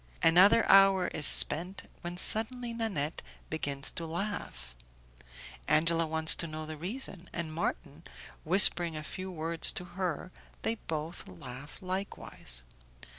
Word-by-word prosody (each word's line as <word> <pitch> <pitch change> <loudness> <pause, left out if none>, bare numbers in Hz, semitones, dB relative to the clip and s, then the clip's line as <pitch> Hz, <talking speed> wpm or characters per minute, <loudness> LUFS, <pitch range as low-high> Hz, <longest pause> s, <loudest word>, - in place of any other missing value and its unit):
Another 185 +7 +5
hour 195 -2 +4
is 150 - +2
spent, 180 +5 +4 0.2
when 175 0 -7
suddenly 235 +5 -1
Nanette 190 -10 -4 0.3
begins 140 -3 -3
to 165 - -8
laugh, 160 - -7 0.9
Angela 165 +1 +1
wants 160 0 +5
to 170 - -3
know 155 0 -8
the 155 0 -8
reason, 185 - 0
and 165 -2 -6
Marton 165 - -5 0.4
whispering 170 -2 +4
a 155 - -7
few 185 +4 -8
words 165 -1 +3
to - - -6
her, 180 -1 -5 0.3
they 225 - -1
both 160 -6 -7
laugh 125 - -12
likewise. 185 - -7
170 Hz, 125 wpm, -29 LUFS, 155-190 Hz, 0.9 s, Another